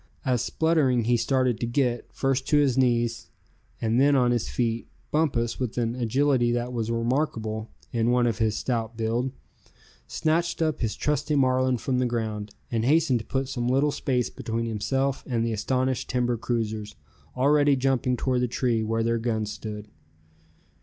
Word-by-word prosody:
As 125 -3 +1
spluttering 150 -7 +2
he 120 +2 +2
started 125 -1 +1
to 120 - -1
get, 120 -1 -1
first 135 -1 -1
to 150 - +3
his 140 -4 +3
knees 120 -3 +1 0.5
and 115 +3 +2
then 140 +1 +5
on 125 -2 +3
his 120 -2 0
feet, 115 -1 -1 0.2
Bumpus, 135 -7 0
with 125 -3 -3
an 115 -1 0
agility 125 +1 +2
that 120 +1 -2
was 115 -2 -2
remarkable 115 -2 -1 0.2
in 115 0 +1
one 125 0 +3
of 115 -5 0
his 110 -1 +1
stout 115 -2 -2
build, 115 +3 -1 0.8
snatched 165 +2 0
up 155 -2 0
his 110 -3 -1
trusty 150 +1 0
Marlin 130 -1 +2
from 125 +2 -1
the 125 - +2
ground, 110 -3 -3 0.2
and 115 -2 0
hastened 140 -1 +3
to 110 - -9
put 135 -1 -1
some 120 -2 -2
little 135 +4 +2
space 130 -4 -1
between 115 -2 -3
himself 135 +5 -1
and 115 -3 0
the 115 - -1
astonished 130 +4 -1
timber 125 -1 +1
cruisers, 110 -2 -3 0.4
already 145 +2 +4
jumping 130 -1 +1
toward 125 -1 0
the 125 - +1
tree 120 -1 0
where 115 +1 0
their 115 0 +1
guns 110 -2 -1
stood. 105 0 -7
120 Hz, 170 wpm, -26 LUFS, 115-135 Hz, 0.8 s, then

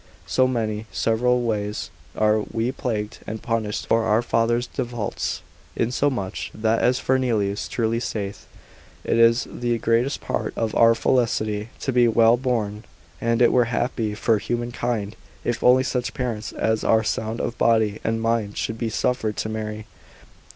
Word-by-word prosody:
So 130 0 +3
many 110 -3 -2
several 125 +2 +1
ways 105 -2 -2 0.2
are 110 0 +3
we 115 +3 -2
plagued 110 -5 -3
and 110 +1 -4
punished 110 -3 -2
for 115 0 +2
our 110 +2 +2
father's 120 +1 +1
defaults; 120 -4 -3 0.3
insomuch 120 -4 -1
that 110 +1 +1
as 125 +1 +3
Fernelius 115 -7 0
truly 115 -1 0
saith, 105 -4 -4 0.6
It 115 - +1
is 115 +1 +5
the 120 -1 -1
greatest 115 +4 +1
part - - -3
of 110 -2 -1
our 115 0 +5
felicity 110 -3 0
to 135 - -1
be 120 -1 +5
well 115 0 +5
born, 115 -4 -2 0.4
and 115 +1 +2
it 120 - +5
were 125 -1 +4
happy 115 -2 -1
for 110 0 +2
human 120 +2 -3
kind, 115 -4 -2 0.3
if 120 -1 -2
only 130 +1 +6
such 125 -2 -2
parents 115 -6 -3
as 110 -1 0
are 110 0 +3
sound 110 +1 -2
of 120 - -2
body 110 -2 +3
and 115 0 -1
mind 115 -3 0
should 115 0 -3
be 115 - -1
suffered 110 -1 -1
to 110 - -2
marry. 110 -1 -4
115 Hz, 160 wpm, -23 LUFS, 110-120 Hz, 0.6 s, only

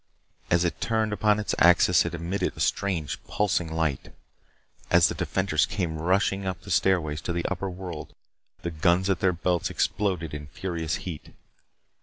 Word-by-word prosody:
As 85 0 +3
it 85 -3 -2
turned 110 -2 0
upon 105 0 +2
its 105 - -2
axis, 90 +1 +5
it 85 0 -3
emitted 85 +4 -2
a - - -9
strange 85 -8 -1
pulsing 90 -5 0
light. 80 -4 -1 0.8
As - - +5
the - - -2
defenders 95 -5 0
came 85 -6 -2
rushing 95 +3 +1
up 90 -3 -3
the 100 - -9
stairways 80 -3 +2
to 85 - -3
the 85 0 -2
upper 95 +1 -2
world, 90 -3 -7 0.5
the 85 - -2
guns 85 +4 +2
at 90 - 0
their 90 - +3
belts 90 0 0
exploded 90 -7 -1
in 75 -1 -6
furious 85 +1 -3
heat. 85 -5 -7
90 Hz, 165 wpm, -26 LUFS, 80-95 Hz, 0.8 s, axis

